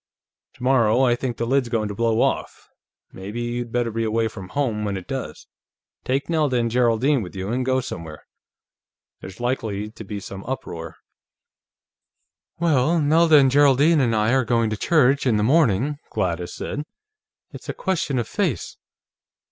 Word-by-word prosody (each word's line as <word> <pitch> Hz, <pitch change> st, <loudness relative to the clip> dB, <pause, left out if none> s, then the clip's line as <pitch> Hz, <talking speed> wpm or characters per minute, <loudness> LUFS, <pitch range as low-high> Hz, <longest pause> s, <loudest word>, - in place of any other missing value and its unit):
Tomorrow, 125 Hz, -1 st, +2 dB
I 120 Hz, -2 st, +3 dB
think 120 Hz, -1 st, -4 dB
the 115 Hz, -, -1 dB
lid's 130 Hz, 0 st, +1 dB
going 110 Hz, -3 st, 0 dB
to 105 Hz, -, -5 dB
blow 115 Hz, +1 st, +1 dB
off. -, -, -2 dB, 0.4 s
Maybe 100 Hz, +5 st, -7 dB
you'd 120 Hz, 0 st, -4 dB
better 120 Hz, -1 st, 0 dB
be 115 Hz, +1 st, -2 dB
away 110 Hz, +1 st, 0 dB
from 95 Hz, -4 st, -10 dB
home 115 Hz, -4 st, -1 dB
when 100 Hz, -2 st, -2 dB
it 95 Hz, -, -9 dB
does. -, -, -6 dB, 0.6 s
Take 135 Hz, +3 st, -1 dB
Nelda 150 Hz, -6 st, +1 dB
and 115 Hz, -1 st, 0 dB
Geraldine 125 Hz, +3 st, +2 dB
with 90 Hz, -2 st, -8 dB
you, 95 Hz, +1 st, -4 dB
and 125 Hz, +2 st, 0 dB
go 130 Hz, 0 st, +1 dB
somewhere. 80 Hz, -, -8 dB, 0.9 s
There's 95 Hz, 0 st, -10 dB
likely 110 Hz, -4 st, -2 dB
to 110 Hz, -, -10 dB
be 100 Hz, 0 st, -6 dB
some 100 Hz, 0 st, -8 dB
uproar." 85 Hz, -11 st, -6 dB, 1.6 s
"Well, 165 Hz, -1 st, +2 dB
Nelda 160 Hz, +1 st, +5 dB
and 135 Hz, -2 st, +5 dB
Geraldine 145 Hz, +3 st, +4 dB
and 120 Hz, -4 st, +2 dB
I 110 Hz, +3 st, +2 dB
are 130 Hz, -1 st, +3 dB
going 115 Hz, -1 st, +1 dB
to -, -, -1 dB
church, 135 Hz, +2 st, +2 dB
in 115 Hz, -4 st, +3 dB
the 105 Hz, -, +1 dB
morning," 140 Hz, -, +2 dB
Gladys 90 Hz, -1 st, -2 dB
said. 145 Hz, -, -4 dB, 0.7 s
"It's -, -, -11 dB
a -, -, -1 dB
question 175 Hz, -8 st, -1 dB
of 120 Hz, -3 st, -1 dB
face. 175 Hz, -, -2 dB
120 Hz, 165 wpm, -22 LUFS, 105-135 Hz, 1.6 s, Nelda